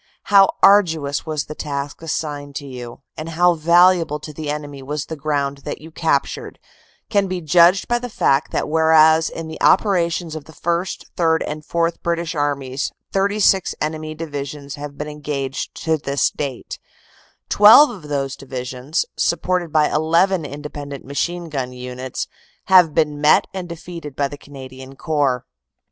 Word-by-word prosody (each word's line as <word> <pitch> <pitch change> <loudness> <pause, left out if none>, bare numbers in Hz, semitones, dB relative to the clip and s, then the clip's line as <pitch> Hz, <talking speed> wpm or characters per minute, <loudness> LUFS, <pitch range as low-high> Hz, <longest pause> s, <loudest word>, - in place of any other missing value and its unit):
"How 195 -1 +8
arduous 165 -8 +4
was 155 -2 -2
the 155 - -7
task 145 -1 -5
assigned 145 -3 -4
to 145 - -5
you, 125 -3 -9
and 155 +1 -6
how 175 +2 +3
valu 175 +3 +5
able 150 -2 -3
to 150 - -8
the 150 0 -5
enemy 145 -2 -5
was 145 +2 -4
the 160 - -6
ground 140 -2 -2
that - - -6
you 160 +2 -12
captured, 160 -4 -1 0.5
can 200 -1 +2
be 185 -1 -3
judged 175 +3 +4
by 240 0 +1
the 245 0 -6
fact 140 -9 +1
that - - -1
whereas 160 0 +5
in 165 -1 -7
the 160 - -9
operations 170 -4 +2
of 155 -2 -7
the 160 - -14
First, 170 +4 -2
Third 160 -2 +2
and 150 0 -5
Fourth 170 +1 -1
British 170 -1 -2
Armies 140 -3 -2 0.2
36 195 -1 +2
enemy 155 0 -3
divisions 145 -2 -6
have 145 0 -8
been 150 - -4
engaged 145 -3 -4
to 160 -1 +1
this 140 -1 0
date, 135 -4 -5 0.7
12 220 +8 +8
of 175 -10 -10
those 135 -2 -2
divisions, 130 +3 -4
supported 175 0 0
by 155 -1 +2
1 150 - +2 0.3
1 180 -5 -1
independent 145 -1 -7
machine 170 +5 -3
gun 130 -5 -4
units, 125 0 -5 0.5
have 175 -5 +6
been 150 -2 +1
met 150 +1 +5
and 185 -2 -6
defeated 165 -3 -8
by 140 - 0
the 145 - -8
Canadian 135 -2 -11
Corps. 140 -5 0
155 Hz, 160 wpm, -20 LUFS, 140-170 Hz, 0.7 s, How